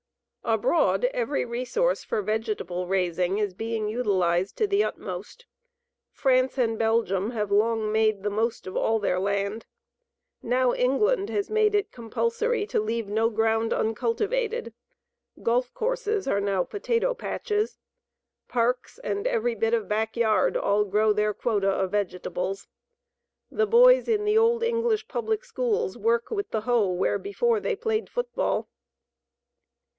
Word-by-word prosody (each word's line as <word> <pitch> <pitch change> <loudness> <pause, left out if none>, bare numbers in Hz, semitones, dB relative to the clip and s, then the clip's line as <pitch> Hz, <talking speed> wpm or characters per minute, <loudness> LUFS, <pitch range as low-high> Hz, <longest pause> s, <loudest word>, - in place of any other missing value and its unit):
Abroad - - +2
every 475 - -1
resource 255 - -1
for 210 - -2
vegetable 210 -4 -2
raising 180 0 0
is 205 -3 -1
being 225 +2 -3
utilized 190 -5 0
to 435 - +2
the 400 +1 +2
utmost. 485 +2 -6 0.7
France 260 -1 +2
and 225 -3 0
Belgium 225 -3 +1
have 210 -4 -3
long 215 +1 +2
made 215 -2 +2
the 205 - -1
most 225 +2 -1
of 185 - -7
all 225 - +2
their 190 -4 0
land. 200 +3 -2 0.7
Now 250 +1 +2
England 395 - +1
has 410 0 -2
made 430 -1 +3
it 410 0 0
compulsory 460 - -1
to - - 0
leave 225 0 -2
no 220 +2 +1
ground 225 0 +1
uncultivated. 330 - -1 0.7
Golf 245 +2 +1
courses 445 - -1
are 200 -6 +1
now 195 -2 +1
potato 465 +4 -1
patches. 430 -3 -2 0.7
Parks 245 +1 -1
and 200 -1 -2
every 235 +1 0
bit 225 +1 +1
of 220 -4 -3
back 220 +3 -1
yard 220 -2 +2
all 205 +1 +2
grow 210 +2 +2
their 210 0 +1
quota 205 -4 0
of 190 -1 0
vegetables. 195 -1 -3 0.8
The 435 0 +1
boys - - +6
in 420 -2 +1
the 420 +1 +4
old 465 +1 +3
English 460 -1 0
public 450 -3 -2
schools 460 -4 -1
work 470 +1 +1
with 405 -3 -2
the 220 - -2
hoe 235 -2 +2
where 180 +1 0
before 450 +3 0
they 460 +2 -1
played 445 +1 -2
football. 485 0 -2
230 Hz, 140 wpm, -26 LUFS, -, 0.8 s, boys